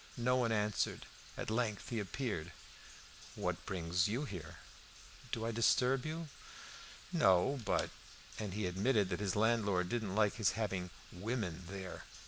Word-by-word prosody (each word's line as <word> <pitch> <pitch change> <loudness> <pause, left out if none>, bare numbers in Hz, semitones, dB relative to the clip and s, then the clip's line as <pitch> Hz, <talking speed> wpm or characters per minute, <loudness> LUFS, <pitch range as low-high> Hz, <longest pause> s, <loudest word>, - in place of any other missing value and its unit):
No 125 +1 +3
one 120 -3 +2
answered. 105 -2 0 0.3
At - - -3
length 110 -3 0
he 115 - -1
appeared. 100 - -3 0.8
"What - - -2
brings 85 -1 +1
you 120 +8 -1
here?" 85 - -7 0.8
"Do 115 - -1
I 115 - 0
disturb 125 +4 +3
you?" 160 +1 -3 0.8
"No; 95 +10 +4
but - - +1 0.2
" - - -14
And 100 -3 -3
he 105 -2 0
admitted 100 +3 +2
that 90 - -1
his 100 -3 0
landlord 105 -5 +2
didn't 110 -4 -1
like 105 -1 +3
his 110 -4 +3
having 95 -5 -1 0.2
"women" 95 -3 -3
there. 95 -1 -6
105 Hz, 145 wpm, -36 LUFS, 95-115 Hz, 0.8 s, No